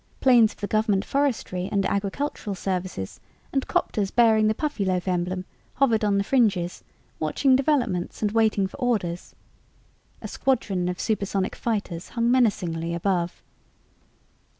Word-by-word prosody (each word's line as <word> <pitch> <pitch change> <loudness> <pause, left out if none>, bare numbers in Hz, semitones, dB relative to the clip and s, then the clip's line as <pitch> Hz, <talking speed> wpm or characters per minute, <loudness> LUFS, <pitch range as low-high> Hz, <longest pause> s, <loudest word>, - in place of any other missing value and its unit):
Planes 240 -4 +5
of - - -23
the - - 0
government 210 -2 +1
forestry 235 -10 -1
and 200 -2 +1
agricultural 200 +2 -2
services 185 - -4 0.3
and 270 -1 0
'copters 200 -3 0
bearing 220 -2 +4
the 215 - +1
Puffyloaf 195 - -1
emblem 185 0 -1 0.3
hovered 235 -6 +2
on 205 -1 +2
the 200 - +2
fringes, 200 -8 +1 0.4
watching 255 - +2
developments 250 - 0
and 210 - +1
waiting 215 -3 +2
for 190 - -7
orders. 210 -10 -2 0.8
A - - -7
squadron 200 -9 0
of 180 - -4
supersonic 200 -3 -1
fighters 200 -7 -3
hung 235 0 +1
menacingly 170 -9 +1
above. 175 -1 -1
205 Hz, 130 wpm, -25 LUFS, 185-235 Hz, 0.8 s, Planes